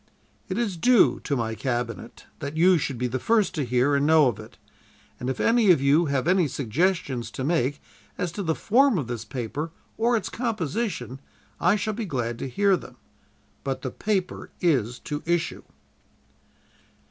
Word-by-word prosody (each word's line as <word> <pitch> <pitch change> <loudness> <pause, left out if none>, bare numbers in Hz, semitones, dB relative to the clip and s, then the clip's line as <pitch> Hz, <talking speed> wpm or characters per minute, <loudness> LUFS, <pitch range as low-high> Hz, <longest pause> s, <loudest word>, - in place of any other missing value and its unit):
"'It 185 - -2
is 215 -7 -1
due 245 +5 +4
to 145 - -2
my 115 -3 -2
Cabinet 120 -1 -4
that 140 +2 -5
you 180 +1 +5
should 135 -3 -3
be 125 - -2
the 125 +1 -2
first 220 - +2
to 150 - -1
hear 125 +3 +2
and 140 +1 +2
know 160 -1 +6
of 115 -4 -2
it, 110 - -12 0.6
and 125 - -3
if 130 - -3
any 230 -3 +3
of 175 - +6
you 145 +5 +3
have 140 +1 0
any 180 -2 +3
suggestions 140 - -1
to 130 - -5
make 145 -2 0 0.4
as 180 -2 -2
to 200 - -5
the 160 -4 0
form 260 0 +3
of 145 - -1
this 120 -1 -5
paper 130 +6 -4 0.3
or 235 +1 +3
its - - -4
composition, 190 - -3 0.4
I 180 +4 +4
shall 215 +1 -2
be 225 +1 -4
glad 120 - -3
to 135 - -4
hear 200 +9 +3
them. - - -10 0.7
But 135 -1 -3
the 130 - -3
paper 195 - -2
is 125 -9 +1
to 145 0 -4
issue.' 170 -1 -1
150 Hz, 180 wpm, -25 LUFS, 125-190 Hz, 0.7 s, know